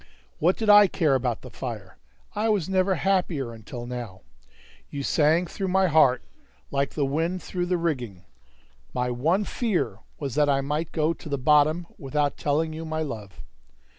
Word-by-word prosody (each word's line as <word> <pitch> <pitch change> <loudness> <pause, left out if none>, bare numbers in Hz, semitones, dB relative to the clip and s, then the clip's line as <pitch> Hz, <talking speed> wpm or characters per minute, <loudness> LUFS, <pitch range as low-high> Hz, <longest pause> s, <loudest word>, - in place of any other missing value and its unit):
What 175 +4 +3
did 220 - -2
I 205 -1 +8
care 160 -6 +1
about 125 -3 0
the 125 - -10
fire? 110 -8 -7 0.3
I 220 +2 0
was 205 -7 +1
never 190 0 +2
happier 175 -10 0
until 115 +2 -8
now! 120 -6 -6 0.7
You 140 -1 -5
sang 160 +5 +3
through 190 +3 -4
my 190 +1 +3
heart 135 -5 +4 0.5
like 140 0 -1
the 145 - +1
wind 165 +5 -1
through 175 -1 -3
the 180 0 +1
rigging; 125 - -3 0.7
my 125 0 0
one 160 +12 +1
fear 215 -2 -1 0.2
was 140 -4 -4
that 150 0 +3
I 135 -1 +2
might 150 +3 -2
go 160 0 +1
to 160 - -11
the 140 - -1
bottom 150 +4 +3
without 145 0 -1
telling 155 +2 0
you 160 +1 -6
my 160 0 -2
love. 110 -9 -8
150 Hz, 170 wpm, -25 LUFS, 130-175 Hz, 0.7 s, I